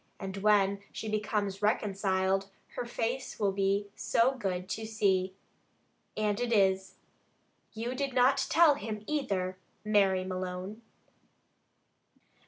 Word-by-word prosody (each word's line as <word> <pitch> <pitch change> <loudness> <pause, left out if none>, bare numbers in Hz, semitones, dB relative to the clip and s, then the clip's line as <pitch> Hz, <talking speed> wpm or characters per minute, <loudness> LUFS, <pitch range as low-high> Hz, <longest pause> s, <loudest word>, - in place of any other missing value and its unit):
And 190 0 -5
when 200 -1 +3
she 220 - -6
becomes 210 -2 -1
reconciled, 195 -2 +1 0.2
her 245 - -5
face 240 +2 -3
will 200 -2 +2
be 200 +1 0
so 235 +3 +2
good 185 -7 -3
to 220 - -3
see.' 190 -4 +1 0.8
And 210 0 0
it 245 -1 -1
is. 190 -3 +2 0.8
You 230 +3 -3
did 270 0 -3
not 255 +2 +4
tell 325 -2 +6
him 215 -4 -5
either, 195 -11 -2 0.3
Mary 195 -3 +3
Malone!" 185 +3 -5
205 Hz, 115 wpm, -30 LUFS, 190-225 Hz, 0.8 s, tell